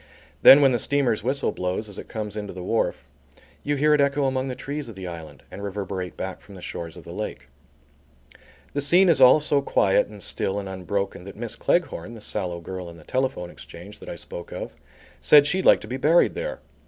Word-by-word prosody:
Then 140 - +10
when 135 -2 +5
the 120 - +1
steamer's 130 -4 +1
whistle 130 +5 -1
blows 90 +4 -3
as 100 - -9
it - - -9
comes 105 -2 -5
into 105 -2 -5
the 90 0 -7
wharf, 115 +5 -1 0.5
you 145 - -1
hear 150 +2 +3
it 150 - +4
echo 140 0 +2
among 130 0 0
the 130 - -4
trees 145 -1 -5
of 110 - -10
the 95 -1 -7
island, 80 -5 -9
and 100 - -8
reverberate 95 -2 -5
back 95 0 -5
from 100 - -14
the 90 - -11
shores 85 -2 -6
of - - -11
the - - -10
lake. - - -6 1.2
The 145 - -1
scene 175 +6 +5
is 150 -5 +4
all 130 +4 +8
so 145 -1 +1
quiet 95 -7 +2
and 105 -2 -9
still 95 - -1
and 100 -1 -4
unbroken, 95 0 -3
that 100 - -10
Miss 115 -1 -4
Cleghorn, 120 - -1
the 115 - -10
sallow 90 -5 -2
girl 90 +1 -7
in 85 - -12
the 80 - -15
telephone 130 - -2
exchange, 95 +5 -12
that - - -10
I - - -5
spoke 85 - -9
of - - -6 0.5
said 145 -1 +7
she'd 185 +5 0
like - - +6
to - - -9
be 130 - -4
buried 160 +6 +4
there. - - -5
110 Hz, 220 wpm, -24 LUFS, 95-140 Hz, 1.2 s, Then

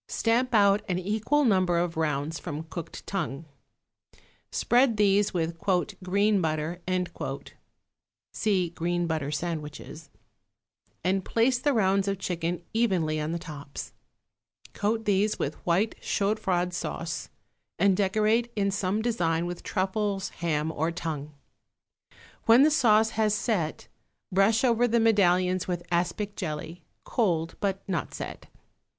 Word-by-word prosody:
Stamp 240 +2 +1
out 200 0 +5
an 180 - +1
equal 220 +10 +1
number 185 -6 +3
of 170 -1 0
rounds 155 0 -1
from 155 -2 -5
cooked 165 +1 -8
tongue. 165 -6 -3 1.1
Spread 240 -2 +3
these 205 0 +3
with 165 -1 -2 0.4
"green 200 +2 +2
butter" 160 +2 -2 1.5
(see 190 -6 +1
Green 175 +1 -1
Butter 160 -4 -2
Sandwiches) 155 -1 -5 0.9
and 190 +2 +1
place 240 +5 +2
the 285 +2 +1
rounds 195 -3 +2
of 200 0 0
chicken 175 -2 -3
evenly 185 -9 +1
on 150 +1 -2
the 170 - -1
tops. 150 -5 -8 0.8
Coat 220 +2 -1
these 205 +1 +2
with 150 - -4
white 190 +6 +2
chaud 205 +2 0
froid 180 -1 0
sauce 165 -2 -4 0.5
and 195 +2 +4
decorate 215 +4 +2
in 200 -2 +1
some 200 +2 -1
design 170 -8 0
with 175 0 -5
truffles, 195 0 -1
ham 160 -2 -1
or 160 +1 -1
tongue. 155 -3 -4 1.2
When 230 +4 +8
the 310 - +5
sauce 220 -6 +4
has 215 -2 +1
set, 195 -9 -1 0.4
brush 195 +5 +3
over 245 -1 +3
the 235 0 +2
medallions 185 -4 +3
with 175 -1 -3
aspic 190 +4 -1
jelly, 165 0 -5 0.2
cold 170 -8 0
but 195 -1 -2
not 185 -4 -3
set. - - -7
185 Hz, 130 wpm, -27 LUFS, 165-215 Hz, 1.5 s, When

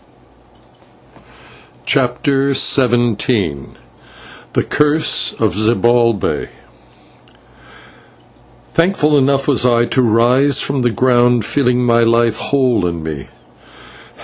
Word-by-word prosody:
CHAPTER 135 +1 0
XVII 120 - 0 0.9
THE - - 0
CURSE 150 +1 +1
OF - - 0
ZIBALBAY 115 +1 0 2.2
Thankful 165 -3 0
enough 135 0 +1
was 140 -4 +2
I 120 -1 +2
to 130 - 0
rise 125 +4 +2
from 140 0 -2
the 120 -1 0
ground 120 0 +1
feeling 125 -2 0
my 115 -1 +2
life 115 -1 +1
whole 125 -10 -1
in 85 -2 -6
me. 75 -4 -7
120 Hz, 90 wpm, -15 LUFS, 115-135 Hz, 2.2 s, was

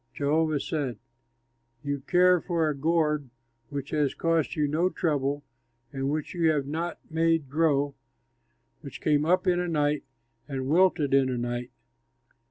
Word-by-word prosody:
Jehovah 155 +1 +1
said, 140 -5 -3 0.9
"You 145 -1 -2
care 180 +4 +4
for 170 -3 0
a 150 - -1
gourd 150 -2 +1 0.4
which 140 -1 -5
has 150 -3 0
cost 165 -2 0
you 150 -1 +1
no 165 +5 +1
trouble 145 -4 -1 0.5
and 135 0 -2
which 150 0 -3
you 170 -2 +2
have 145 -3 +1
not 165 +4 -3
made 165 -3 +1
grow, 145 -2 +2 0.9
which 140 -4 -9
came 150 -1 +2
up 180 +3 +2
in 180 -1 +2
a 180 - -1
night 150 -3 0 0.4
and 135 -2 -4
wilted 160 -2 +3
in 135 -1 +4
a 125 - -2
night. 120 +1 -3
150 Hz, 150 wpm, -27 LUFS, 140-165 Hz, 0.9 s, care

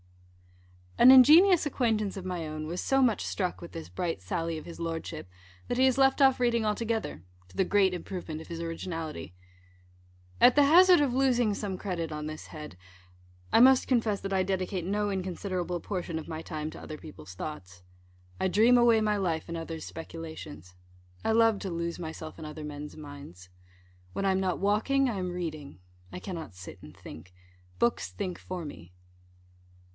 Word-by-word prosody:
_ - - +5
An 255 - +11
ingenious 315 +7 +8
acquaintance 225 -8 0
of 190 - -6
my 175 -3 -3
own 155 0 -5
was 175 +3 -3
so 270 0 +2
much 240 -5 +2
struck 185 -3 -2
with 170 - -9
this 165 -1 -8
bright 170 - -3
sally 165 - -3
of 155 - -9
his 170 - -10
Lordship, 165 - -5 0.4
that 245 - -2
he 260 - +5
has 260 -1 +3
left 270 +1 +4
off 265 -2 +5
reading 235 -2 +2
altogether, 220 - -2 0.3
to - - -16
the 190 - +3
great 195 -2 +3
improvement 175 -3 -6
of - - -12
his 165 -1 -6
originality. 165 - -5 1.1
At 250 - +7
the 290 - +6
hazard 355 +2 +7
of 275 -4 +1
losing 245 -4 +2
some 200 -2 -4
credit 175 -5 -4
on 150 0 -5
this 155 0 -7
head, 150 - -9 0.7
I - - +5
must 260 +1 +6
confess 225 -5 +1
that 195 0 -4
I 190 -1 +2
dedicate 185 -1 -2
no 205 +2 0
inconsiderable 185 -2 -3
portion 175 -3 -4
of 160 - -9
my 160 -1 -5
time 155 -1 -5
to - - -10
other 155 - -7
people's 150 -13 -11
thoughts. 90 - -8 0.6
I 190 - +1
dream 225 +6 +5
away 235 -2 +5
my 210 -1 +1
life 165 -5 -2
in 170 - -4
others' 165 -1 -6
speculations. 160 - -9 0.5
I - - +1
love 225 -2 +4
to 195 - -4
lose 170 0 -3
myself 160 -1 -7
in 160 - -7
other 150 0 -7
men's 150 0 -7
minds. 140 - -11 0.6
When 195 - -2
I 195 - +3
am 190 - +1
not 185 -2 -1
walking, 225 +7 +2
I 220 - -3
am 180 -1 -3
reading; 155 - -6 0.3
I - - -6
cannot 170 - -7
sit 90 0 -11
and 75 -1 -13
think. 90 +3 -12 0.5
Books 95 -6 +1
think 180 - -4
for 180 -3 -6
me. 90 - -10
180 Hz, 185 wpm, -29 LUFS, 155-220 Hz, 1.1 s, An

